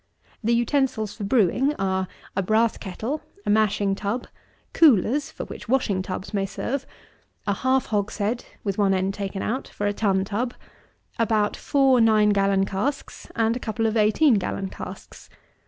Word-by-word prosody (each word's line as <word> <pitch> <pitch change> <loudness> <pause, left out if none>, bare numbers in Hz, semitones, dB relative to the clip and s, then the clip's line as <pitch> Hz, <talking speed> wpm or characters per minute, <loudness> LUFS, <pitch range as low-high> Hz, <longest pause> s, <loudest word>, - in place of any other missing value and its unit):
The 235 +2 +3
utensils 240 -3 0
for 215 - -7
brewing 250 - +2
are, 190 -1 -1 0.3
a 195 - +1
brass 220 +4 +2
kettle, 225 +10 -4 0.2
a - - +2
mashing 210 -2 +2
tub, 205 +5 -3 0.5
coolers, 275 - +4
(for - - -7
which - - -10
washing 235 -7 +1
tubs 185 +3 -6
may 195 -1 0
serve,) 270 +7 -3 0.6
a 200 - +1
half 260 +5 +1
hogshead, 210 +2 -1 0.2
with 200 -1 -2
one 195 -2 +3
end 190 +1 0
taken 195 -1 -4
out, 255 +5 -2
for 205 - -5
a 205 - +1
tun 195 -2 +1
tub, 235 +5 -2 0.6
about 215 -2 +2
four 270 -4 +3
nine 215 -2 +5
gallon 195 -1 +2
casks, 255 +10 -3
and 225 0 +2
a - - -3
couple 225 -1 -2
of 220 0 +1
eighteen 220 +3 +4
gallon 195 0 -3
casks. - - -10
215 Hz, 160 wpm, -24 LUFS, 195-240 Hz, 0.6 s, nine